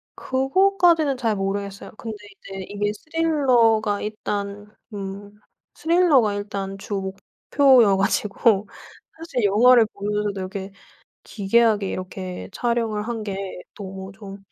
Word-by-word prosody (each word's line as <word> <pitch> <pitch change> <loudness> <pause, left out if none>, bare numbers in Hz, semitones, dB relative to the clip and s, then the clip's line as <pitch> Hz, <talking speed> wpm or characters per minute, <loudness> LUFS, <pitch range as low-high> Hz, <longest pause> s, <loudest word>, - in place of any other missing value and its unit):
그거까지는 320 +1 +2
잘 230 -4 0
모르겠어요. 200 0 -4
근데 220 -2 -6 0.2
이제 195 0 -8
이게 205 0 -1
스릴러가 245 -8 +2
일단 205 -1 -4 0.2
음. 200 0 -7 0.4
스릴러가 320 - +3
일단 200 -1 -4
주 200 +1 -5
목표여 200 +4 +2
가지고 205 +1 +1 0.5
사실 320 -7 -3
영화를 230 +4 +6
보면서도 205 0 -2
이렇게 190 +1 -6 0.5
기괴하게 210 -1 +2
이렇게 185 0 -6
촬영을 230 -3 -1
한 230 -2 -3
게 195 -2 -5 0.2
너무 190 -1 -8
좀 200 -2 -10
210 Hz, 265 characters per minute, -23 LUFS, 195-240 Hz, 0.5 s, 영화를